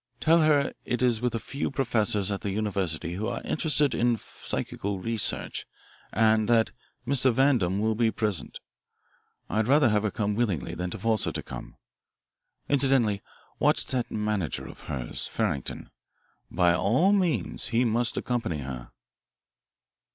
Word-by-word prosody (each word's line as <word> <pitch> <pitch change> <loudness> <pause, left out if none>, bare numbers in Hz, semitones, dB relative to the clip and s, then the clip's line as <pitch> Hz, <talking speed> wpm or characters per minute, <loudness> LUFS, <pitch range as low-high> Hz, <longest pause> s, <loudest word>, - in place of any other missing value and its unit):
Tell 165 +1 +4
her 150 -3 +3
it 125 +1 -2
is 120 -3 +2
with 125 -1 0
a - - -1
few 140 +5 -3
professors 110 -7 +1
at 100 - -3
the 100 - -3
university 95 -5 -2
who 105 +5 -3
are 120 - -4
interested 150 -3 +2
in 120 -1 +2
psychical 100 -2 -3
research 115 +2 -1 0.4
and 110 0 +3
that 115 -1 +3 0.3
Mr. 130 0 +3
Vandam 115 -8 +2
will 110 +1 +1
be 115 +1 +2
present. 105 - -3 0.9
I'd 110 +1 0
rather 140 -1 +5
have 105 -1 +2
her 105 - 0
come 105 +1 -1
willingly 100 - -1
than 90 +1 -3
to - - -6
force 115 -2 +2
her - - -1
to - - -4
come. - - -9 0.9
Incidentally 130 -8 +2 0.4
watch - - +3
that 125 -2 -2
manager 105 -7 -2
of - - -11
hers, 65 -5 -2
Farrington. 70 - -3 0.6
By 90 -1 +3
all 130 - +3
means 185 -6 0
he 120 +2 +1
must 120 +1 +1
accompany 120 -10 -2
her." 65 -3 -7
110 Hz, 150 wpm, -27 LUFS, 100-125 Hz, 0.9 s, rather